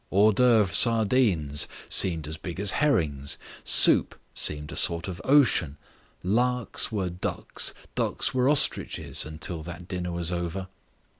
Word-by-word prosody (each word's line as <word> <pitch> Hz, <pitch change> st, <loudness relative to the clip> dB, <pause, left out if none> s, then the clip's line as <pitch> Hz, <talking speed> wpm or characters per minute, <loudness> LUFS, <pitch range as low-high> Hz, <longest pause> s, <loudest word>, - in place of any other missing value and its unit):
Hors 105 Hz, +3 st, +3 dB
d'oeuvre 110 Hz, -5 st, +2 dB
sardines 110 Hz, -, +2 dB, 0.2 s
seemed 80 Hz, -5 st, +1 dB
as 80 Hz, -, -5 dB
big 85 Hz, +2 st, -9 dB
as 100 Hz, -1 st, 0 dB
herrings, 80 Hz, -, -1 dB, 0.3 s
soup -, -, +5 dB
seemed 75 Hz, 0 st, +1 dB
a -, -, -8 dB
sort 85 Hz, +1 st, +1 dB
of 90 Hz, -3 st, -8 dB
ocean, 125 Hz, -, +2 dB, 0.5 s
larks 125 Hz, +7 st, -1 dB
were 95 Hz, -5 st, -3 dB
ducks, 90 Hz, -, -4 dB, 0.2 s
ducks -, -, -1 dB
were 130 Hz, +1 st, +1 dB
ostriches 145 Hz, -, +1 dB
until 80 Hz, +2 st, -4 dB
that 85 Hz, +2 st, -10 dB
dinner 90 Hz, -1 st, -5 dB
was 85 Hz, 0 st, -1 dB
over. 90 Hz, +2 st, -5 dB
90 Hz, 135 wpm, -25 LUFS, 80-115 Hz, 0.5 s, soup